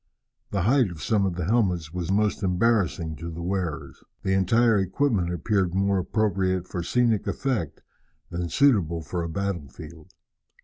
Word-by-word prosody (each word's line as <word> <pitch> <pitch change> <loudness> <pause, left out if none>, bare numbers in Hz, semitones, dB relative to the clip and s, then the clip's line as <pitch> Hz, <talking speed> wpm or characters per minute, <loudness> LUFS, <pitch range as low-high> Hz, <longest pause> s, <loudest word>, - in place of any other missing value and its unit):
The 100 -4 -1
height 125 +1 +3
of 80 -3 -8
some 105 -3 +2
of 90 - -3
the 90 -2 -3
helmets 90 -7 +1
was 90 0 -3
most 105 +2 +1
embarrassing 90 -5 +1
to 85 +1 -6
the 85 +1 -6
wearers. 90 -4 -3 0.2
The 95 - +1
entire 110 +4 +3
equipment 95 -1 0
appeared 95 +1 0
more 100 0 +2
appropriate 95 -2 0
for 90 - -4
scenic 115 +3 +1
effect 120 - -2 0.5
than 85 0 -3
suitable 85 - +2
for 85 +4 -3
a 85 - -3
battlefield. 85 -3 -6
95 Hz, 150 wpm, -25 LUFS, 85-105 Hz, 0.5 s, height